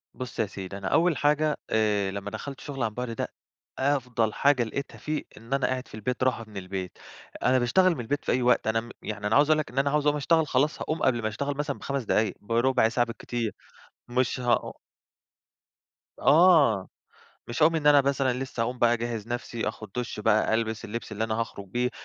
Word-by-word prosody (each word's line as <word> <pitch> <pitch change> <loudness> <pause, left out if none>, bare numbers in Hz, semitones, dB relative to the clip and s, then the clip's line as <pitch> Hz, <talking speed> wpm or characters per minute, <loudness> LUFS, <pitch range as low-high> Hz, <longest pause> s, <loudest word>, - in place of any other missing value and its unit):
بُص 130 -1 -7
يا - - +3
سيدي، 100 -1 -7
أنا 100 -1 -5
أول 165 +2 +3
حاجة، 150 +1 +2
آآ 105 -3 +1
لمّا 100 +1 -5
دخَلت 140 -2 -6
الشُغل 140 -5 -5
عن 115 - +1
بُعد 125 +1 -4
ده، 115 - -3 0.5
أفضل 125 -5 +1
حاجة 140 -3 +3
لقيتها 140 +5 -5
فيه، 155 0 -3
إن 115 +5 -7
أنا 135 - +2
قاعد 130 0 -3
في - - -19
البيت، 125 +4 -2
راحة 125 -3 0
من 105 -2 -10
البيت. 95 -1 -5 0.5
أنا 130 0 +4
باشتغل 180 +9 +3
من - - -8
البيت 145 +5 -3
في - - +1
أي 130 - +2
وقت، 125 -2 +3
أنا 115 +1 +2
م 120 - -12
يعني 105 -1 -4
أنا 110 - +2
عاوز 145 +2 +5
اقول 155 0 +4
لك، 150 - -4
إن 130 - -1
أنا 140 +1 +2
عاوز 150 0 +1
أقوم 150 0 +3
أشتغل، 160 +2 +2
خلاص 145 +4 +1
هاقوم 155 0 -2
قبل 120 -3 +2
ما 110 - -1
اتغل 140 +6 -3
مثلًا 145 -1 -2
ب5 140 -1 -3
دقايق، 110 0 +1
برُبع 115 +2 +2
ساعة 120 +1 +1
بالكتير. 115 -1 -3 0.6
مش 125 +1 0
هأ 120 -1 +1 1.5
آه، 145 - +5 0.6
مش 120 +6 -1
هاقوم 165 +1 +5
إن 150 - -2
أنا 145 -1 +8
مثلًا 135 -1 +1
لسّه 125 -1 -5
هاقوم 125 +2 -3
بقى 120 -1 +4
أجهِّز 115 -2 -3
نَفسي، 120 -1 -3
آخُد 110 -3 -8
دُش 120 -3 -3
بقى، 110 +1 +3
ألبس 110 -1 -1
اللبس 115 0 -6
اللي 110 +2 -1
أنا 110 -1 -2
هاخرج 100 -3 -5
بيه، 125 +5 0
125 Hz, 210 wpm, -27 LUFS, 110-140 Hz, 1.5 s, أنا